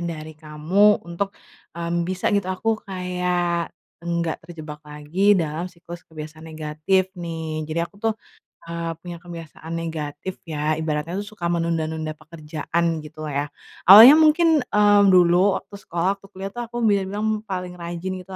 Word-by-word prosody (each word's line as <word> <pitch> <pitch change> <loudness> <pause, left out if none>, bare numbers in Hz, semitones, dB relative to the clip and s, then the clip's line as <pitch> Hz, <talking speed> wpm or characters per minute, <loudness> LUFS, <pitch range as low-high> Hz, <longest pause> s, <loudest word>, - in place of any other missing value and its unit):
dari 160 -2 -5
kamu 160 +7 +2
untuk, 170 +4 -3 0.5
mmm, 170 0 -1
bisa 185 +1 -1
gitu, 200 -2 +1
aku 215 +4 -1
kayak 180 -2 -1 0.3
enggak 170 -1 -2
terjebak 155 -3 -9
lagi 150 +7 +1
dalam 165 +1 -2
siklus 175 -1 -11
kebiasaan 155 0 -9
negatif 155 +5 -1
nih. 165 -3 -5
Jadi 160 +2 -1
aku 170 - -16
tuh, 225 0 +1 0.6
eee, 170 0 -3
punya 175 0 -7
kebiasaan 165 -2 -10
negatif 165 +1 -4
ya, 155 -1 -1
ibaratnya 160 +2 -2
itu 200 - -3
suka 175 -5 -3
menunda-nunda 160 -2 -1
pekerjaan 160 +1 -4 0.2
gitu 155 +1 -9
lah 150 - -4
ya. 140 +1 -1 0.4
Awalnya 220 +7 +12
mungkin, 315 0 +5
eee, 205 -4 +4
dulu 180 +1 +5
waktu - - -9
sekolah 170 -3 -3 0.2
waktu 195 - -16
kuliah 195 0 -7
tuh 240 - -6
aku 240 0 -3
bisa 200 -3 +2
bilang 215 +2 -1
paling 180 -2 -4
rajin 175 +1 -5
gitu 180 - -15
170 Hz, 155 wpm, -23 LUFS, 160-190 Hz, 0.6 s, Awalnya